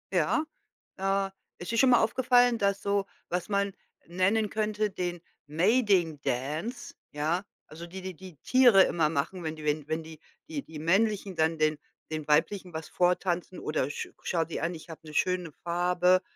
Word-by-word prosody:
Ja. 315 - +2 0.5
Äh, 195 0 0 0.3
ist 175 - -6
dir 230 - 0
schon 260 +2 +5
mal 245 - +6
aufgefallen, 245 +1 +4
dass 200 -2 +1
so 200 -1 0 0.2
was 180 0 -2
man 200 -1 0 0.3
nennen 190 +5 +1
könnte, 215 0 0
den 175 -3 -4 0.3
Mating-Dance, 165 - 0 0.2
ja, 155 +5 -1 0.2
also, 165 +2 -9
die 190 +2 -8
die 185 0 -5
die 185 -1 -12
Tiere 245 -7 +7
immer 165 -4 +2
machen, 165 +4 -2
wenn 160 0 -3
die 155 - -10
wenn 150 -1 0
wenn 160 +1 -2
die 160 -1 -11 0.3
die 275 - -6
männlichen 195 +3 +1
dann 160 +1 +2
den 155 -1 +2 0.3
den 155 -1 -4
weiblichen 175 +4 +1
was 160 0 -6
vortanzen 180 0 0
oder: 140 -3 -1
„Sch - - -5
schau 170 -2 +1
dir 165 - -5
an, 170 +1 -1
ich 160 +2 -12
habe 160 -2 -9
'ne 155 - -9
schöne 180 -1 0
Farbe. 180 +1 +3
180 Hz, 170 wpm, -29 LUFS, 160-200 Hz, 0.5 s, Tiere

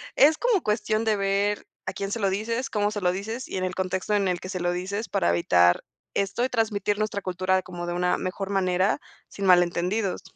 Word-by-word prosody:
es 300 +3 +6
como 470 -7 +2
cuestión 215 +1 0
de 220 - +3
ver 200 +1 0 0.2
a - - -2
quién 195 0 -4
se 230 - -2
lo 195 -2 +2
dices, 230 +6 -2
cómo 210 -1 0
se 205 - -4
lo 180 -1 +3
dices 220 +7 -5
y - - -4
en 185 - -2
el 185 0 -2
contexto 190 +2 -1
en 200 -2 +2
el 180 -1 0
que 185 - -8
se 185 -2 -3
lo 175 0 0
dices, 195 +4 -3
para 85 - +1
evitar 90 0 +4 0.3
esto 200 +5 0
y - - -2
transmitir 210 -3 0
nuestra 215 -2 -1
cultura 185 +1 0
como 175 -1 -7
de 175 - -2
una 180 0 +1
mejor 195 +1 -4
manera 185 0 +1 0.3
sin 200 - -5
malentendidos. 180 +3 +2
195 Hz, 220 wpm, -26 LUFS, 185-210 Hz, 0.3 s, es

